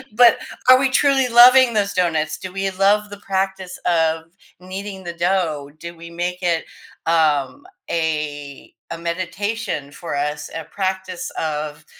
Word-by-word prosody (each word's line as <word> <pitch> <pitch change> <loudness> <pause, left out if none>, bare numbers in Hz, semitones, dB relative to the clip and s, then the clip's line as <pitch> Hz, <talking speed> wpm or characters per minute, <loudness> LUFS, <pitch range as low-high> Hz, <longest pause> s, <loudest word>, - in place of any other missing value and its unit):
But 235 -1 +7 0.3
are 255 0 +9
we 270 0 +2
truly 270 -1 +3
loving 250 +1 +7
those 205 -2 0
donuts? 160 -4 0
Do 185 - -8
we 195 0 -1
love 205 +2 +2
the 205 - -9
practice 190 -1 -3
of 160 -2 +1 0.3
kneading 190 +1 -7
the 170 -1 -5
dough? 170 -5 -1
Do 170 +1 -8
we 170 0 -11
make 175 +2 -4
it, 170 -2 0 0.4
um, 160 - +1 0.2
a 150 -3 -3 0.2
a - - -4
meditation 185 -1 -3
for 165 0 -6
us, 150 +1 -3
a 165 -1 -5
practice 190 -2 -3
of 150 -1 -4
180 Hz, 145 wpm, -20 LUFS, 160-200 Hz, 0.4 s, are